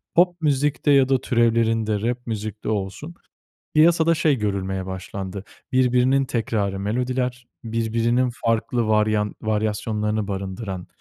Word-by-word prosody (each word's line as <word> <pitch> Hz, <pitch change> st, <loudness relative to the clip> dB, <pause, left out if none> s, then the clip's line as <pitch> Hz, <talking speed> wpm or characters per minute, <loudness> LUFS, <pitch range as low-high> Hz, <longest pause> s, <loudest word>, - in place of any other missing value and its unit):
pop 175 Hz, 0 st, +3 dB
müzikte 145 Hz, 0 st, +1 dB
ya 135 Hz, -2 st, +5 dB
da 130 Hz, -2 st, +2 dB
türevlerinde, 115 Hz, -4 st, +1 dB
rap 120 Hz, +2 st, -2 dB
müzikte 110 Hz, -1 st, -4 dB
olsun 110 Hz, -, -4 dB, 0.6 s
piyasada 165 Hz, +1 st, +5 dB
şey 155 Hz, -3 st, +2 dB
görülmeye 95 Hz, -2 st, -2 dB
başlandı. 95 Hz, +1 st, -6 dB, 0.3 s
Birbirinin 130 Hz, +1 st, +3 dB
tekrarı 105 Hz, -6 st, -1 dB
melodiler, 125 Hz, +3 st, -2 dB, 0.2 s
birbirinin 115 Hz, +2 st, 0 dB
farklı 115 Hz, +1 st, +1 dB
varyant 105 Hz, -1 st, +2 dB
varyasyonlarını 105 Hz, 0 st, -1 dB
barındıran, 95 Hz, -1 st, -5 dB
115 Hz, 110 wpm, -23 LUFS, 105-130 Hz, 0.6 s, ya